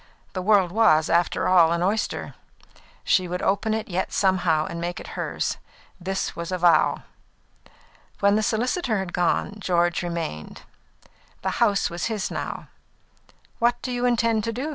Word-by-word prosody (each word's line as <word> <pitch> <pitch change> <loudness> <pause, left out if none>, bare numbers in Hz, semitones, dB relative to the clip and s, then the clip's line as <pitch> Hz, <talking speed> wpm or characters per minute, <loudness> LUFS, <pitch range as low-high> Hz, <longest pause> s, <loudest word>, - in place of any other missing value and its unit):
The 185 - -3
world 190 -2 +3
was, 175 -7 +3
after 170 +1 +1
all, 170 -3 +5
an 170 +1 0
oyster; 210 +4 -1 0.7
she 185 -1 +2
would 180 +1 -4
open 215 +3 +1
it 220 - -4
yet 185 0 -2
somehow 175 -5 +2
and 170 0 -6
make 175 +1 -3
it - - -9
hers; - - -2 0.4
this 190 +2 -3
was 170 +1 -5
a 185 - -1
vow. 175 -1 +3 1.2
When 200 0 +4
the 215 - +2
solicitor 235 - 0
had 190 -2 -4
gone, 180 +3 0
George 175 -3 +1
remained. 170 - -5 0.8
The - - 0
house 205 -6 +2
was 170 - -3
his 220 -4 -2
house - - -13
now. - - -5 0.9
"What 240 +1 +2
do 255 - -3
you 245 0 0
intend 230 -2 +1
to 230 - -1
do?" 260 +7 -4
190 Hz, 165 wpm, -24 LUFS, 175-220 Hz, 1.2 s, all